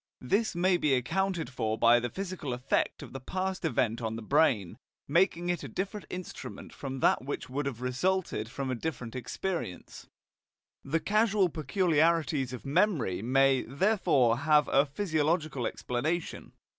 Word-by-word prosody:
This 200 - 0
may 180 +1 +3
be 150 -5 +2
accounted 180 +8 -1
for 110 -4 -1
by 120 +1 +6
the 120 0 -3
physical 185 - -4
effect 125 +2 -1
of - - -11
the 135 - -5
past 185 +7 -3
event 115 -1 0
on 110 -1 -2
the 115 - -6
brain, 115 - +2 0.3
making 175 +2 +2
it 175 -3 -1
a - - -5
different 195 - -4
instrument 180 0 -8
from 135 -2 -6
that - - +3
which 135 -1 -5
would 140 +1 -2
have 125 -4 -5
resulted 130 - -1
from 130 +2 -4
a - - -1
different 125 -3 -5
experience. 145 - -5 0.8
The 155 +4 0
causal 210 -3 +2
peculiarities 160 -4 +1
of 125 - -8
memory 145 - +1
may, 135 +2 +3
therefore, 140 - +2
have 150 0 +4
a 140 +2 +4
physiological 155 - 0
explanation. 155 +8 -3
145 Hz, 150 wpm, -29 LUFS, 125-180 Hz, 0.8 s, by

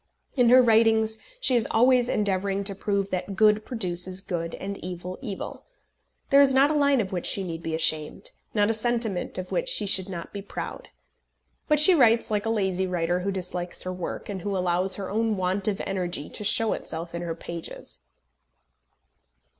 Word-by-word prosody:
In 245 -3 +4
her 255 +1 +7
writings 220 -1 +3 0.2
she 265 - +3
is 235 - +2
always 245 +1 +3
endeavouring 200 -1 0
to 200 0 0
prove 200 0 -2
that 185 +2 -3
good 215 +1 +4
produces 185 -5 -3
good, 170 -4 -4
and 200 +1 -6
evil 180 0 -6
evil. 210 -8 -7 0.6
There 280 +1 +7
is 270 -2 +4
not 275 +3 +5
a - - 0
line 280 -2 +3
of 195 -4 -2
which 180 -2 -2
she 195 - +1
need 165 -2 -6
be 165 -1 -3
ashamed, 160 - 0 0.2
not 205 +1 +3
a - - 0
sentiment 225 -5 -1
of 185 0 -6
which - - 0
she 355 - +3
should 190 -1 +3
not 170 -3 -7
be 200 - -5
proud. 200 - -7 0.8
But 300 -2 +3
she 315 +5 +6
writes 230 -8 +3
like 210 +1 -1
a - - 0
lazy 190 -4 0
writer 175 0 -1
who 195 +2 -2
dislikes 180 -2 -4
her 185 - -4
work, 180 -2 -6
and 195 -3 -5
who 200 +1 -2
allows 180 +1 +2
her 195 -2 -5
own 220 0 0
want 185 +2 -1
of 205 -2 -1
energy 175 -6 -2
to - - -6
show 220 +2 +3
itself 165 +1 -6
in 170 - -4
her 170 -1 -4
pages. 170 - -8
195 Hz, 190 wpm, -25 LUFS, 180-225 Hz, 0.8 s, her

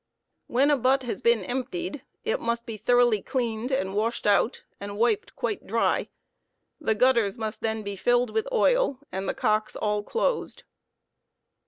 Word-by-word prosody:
When 275 +5 +3
a 290 - +4
butt 265 +2 +2
has 245 - -4
been 235 -4 +3
emptied, 280 - -4 0.2
it 465 +2 0
must 235 0 -2
be 230 -3 -5
thoroughly 240 0 +3
cleaned 240 0 -2
and 190 -7 0
washed 220 +3 -1
out 205 +4 +2 0.2
and 200 0 -6
wiped 400 - +1
quite 420 - -3
dry; - - +1 0.7
the 220 - 0
gutters 235 -3 +3
must 220 -1 -4
then 220 -1 -1
be 200 -1 -4
filled 245 +5 +2
with 445 +2 -1
oil - - +3
and 190 +1 -3
the - - -2
cocks 215 -3 0
all 210 0 0
closed. 465 - -2
235 Hz, 160 wpm, -26 LUFS, 215-265 Hz, 0.7 s, a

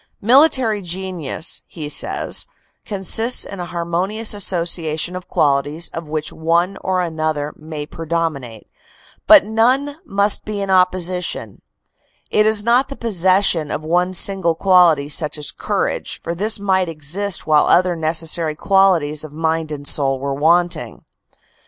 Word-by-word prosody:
"Military 250 -3 +3
genius," 180 -3 -4
he 155 -3 -7
says, 150 - 0 0.4
"consists 225 +4 +1
in 200 - -9
a 175 - -5
harmonious 175 +6 0
association 170 -3 -1
of 185 -1 -8
qualities 145 +3 0
of 165 -1 -7
which 155 0 -3
one 170 +4 0
or 185 -1 -1
another 155 -3 -3
may 155 -1 -7
predominate, 160 -8 -4 0.6
but 315 -6 +8
none 255 +7 +1
must 200 +1 +1
be 210 -1 -5
in 195 -1 -4
opposi 180 -1 +2
tion. - - -7 0.7
It 215 0 +3
is 215 -1 +3
not 240 +4 +2
the 275 - -7
possession 185 - +1
of 155 - -4
one 180 +3 0
single 180 -3 +3
quality 175 -6 +3
such 150 +1 -1
as 150 - -2
courage, - - -3
for 170 - -3
this 210 +6 0
might 190 -3 0
exist 170 +5 -2
whilst 150 -1 +3
other 180 0 +3
necessary 160 0 -1
qualities 170 -5 +2
of 155 -2 -10
mind 160 0 -2
and 145 -1 -6
soul 135 -2 -1
were 140 +1 -3
wanting." 170 +5 0
175 Hz, 140 wpm, -18 LUFS, 155-195 Hz, 0.7 s, but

